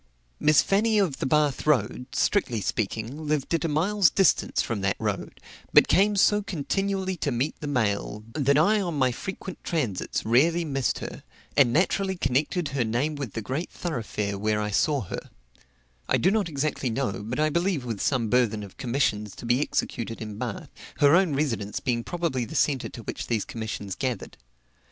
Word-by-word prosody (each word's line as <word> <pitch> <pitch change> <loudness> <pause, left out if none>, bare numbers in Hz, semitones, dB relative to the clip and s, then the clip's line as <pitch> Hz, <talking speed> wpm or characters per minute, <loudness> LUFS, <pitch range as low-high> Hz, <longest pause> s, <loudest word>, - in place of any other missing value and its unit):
Miss 150 -2 +5
Fanny 215 +3 +2
of 185 -9 +1
the - - -1
Bath 150 0 +1
road, 125 -3 +1
strictly 125 - +1
speaking, 110 +9 -3
lived 150 0 0
at 165 - +1
a - - +2
mile's 175 +4 +3
distance 195 +1 +2
from 110 -4 -1
that 95 0 +1
road, - - -3 0.3
but - - +7
came 205 +2 +4
so 205 +1 +4
continually 195 +1 -2
to 145 - -1
meet 125 +5 -1
the 150 - -5
mail, 105 -5 -1
that 140 -1 +2
I 205 +7 +4
on 175 -4 -2
my 130 -2 +3
frequent 190 +7 -7
transits 125 - -2
rarely 165 +9 +3
missed 135 -4 0
her, - - -8 0.3
and 130 -4 +5
naturally 190 +5 +1
connected 145 +4 0
her 135 -3 0
name 120 +7 0
with 140 -8 -5
the 110 - -4
great 135 +10 -3
thoroughfare 105 - -3
where 105 +1 +1
I 105 0 -2
saw 140 +6 +2
her; 95 - -6 0.8
I - - +4
do 185 - +3
not 205 -5 +1
exactly 140 -3 -1
know, 115 -4 -2
but 120 +6 -4
I 155 0 +2
believe 170 -4 0
with 115 -5 -4
some 125 -5 +1
burthen 110 -2 +2
of 100 - -12
commissions 120 -6 -1
to - - -9
be 120 +3 +2
executed 115 -5 -2
in 105 -2 -7
Bath, - - -5 0.3
her 145 +2 +6
own 175 -5 +3
residence 115 -9 -1
being 120 -3 -1
probably 165 -7 -2
the 110 - -7
centre 135 -4 +1
to 115 - -10
which - - -5
these 115 -3 0
commissions 110 -3 -5
gathered. 125 -4 -3
135 Hz, 185 wpm, -26 LUFS, 115-165 Hz, 0.8 s, but